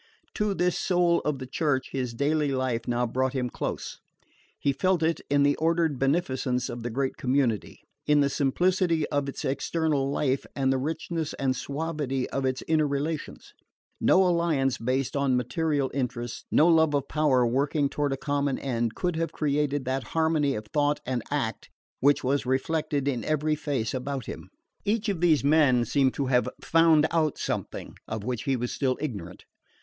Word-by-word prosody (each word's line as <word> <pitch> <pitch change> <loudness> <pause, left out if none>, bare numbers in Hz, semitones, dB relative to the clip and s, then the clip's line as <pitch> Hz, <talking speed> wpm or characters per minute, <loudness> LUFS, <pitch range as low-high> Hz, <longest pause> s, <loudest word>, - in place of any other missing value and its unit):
To 210 -2 0
this 180 -1 +1
soul 175 -2 +2
of 150 -2 -2
the 130 - -6
Church 135 0 -1
his 125 -3 -3
daily 145 +2 +1
life 130 -3 -1
now 120 0 +1
brought 130 +2 -1
him 125 -3 -2
close. - - -4 0.6
He 140 - 0
felt 185 +2 +1
it 165 +1 +1
in 145 0 +3
the 145 0 +3
ordered 165 -3 +1
beneficence 130 -4 0
of 120 - -5
the 120 - -3
great 130 +3 -2
community, 125 -5 0 0.2
in 150 0 +4
the 140 - +4
simplicity 165 +3 +1
of 145 -1 -1
its - - -6
external 145 0 0
life 140 -1 0
and 135 -1 +2
the 130 - 0
richness 160 +2 -3
and 135 -2 0
suavity 140 -2 -3
of 135 -1 -1
its 130 0 -2
inner 155 -2 +3
relations. 145 +2 -4 0.5
No 190 - +5
alliance 165 -7 +1
based 130 +4 -1
on 140 -2 +2
material 140 +2 0
interests, 125 -3 -3
no 155 - +5
love 160 -3 +4
of 140 -1 -1
power 145 -5 +2
working 140 +4 +1
toward 145 0 -1
a 135 - -1
common 140 -1 -1
end, 120 -4 -2
could 175 -2 -1
have 165 0 -1
created 145 -2 0
that 130 +1 -1 0.2
harmony 160 -4 +2
of 105 - -5
thought 145 0 +2
and 125 -1 -1
act 135 -6 -2 0.3
which 140 +3 +3
was 140 +2 +1
reflected 145 +1 0
in 130 -4 -1
every 155 0 0
face 145 -7 -2
about 130 -1 -3
him. - - -8 0.3
Each 215 +1 0
of 185 -5 -2
these 160 -5 +4
men 140 -5 +4
seemed 135 +2 +2
to 140 - -1
have 125 -1 +2
FOUND 165 -2 +4
OUT 160 -3 +1
SOMETHING - - -4
of 110 -1 -4
which 120 -1 -3
he 135 - +1
was 125 0 -3
still 130 -3 0
ignorant. 100 - -6
140 Hz, 175 wpm, -27 LUFS, 130-155 Hz, 0.6 s, No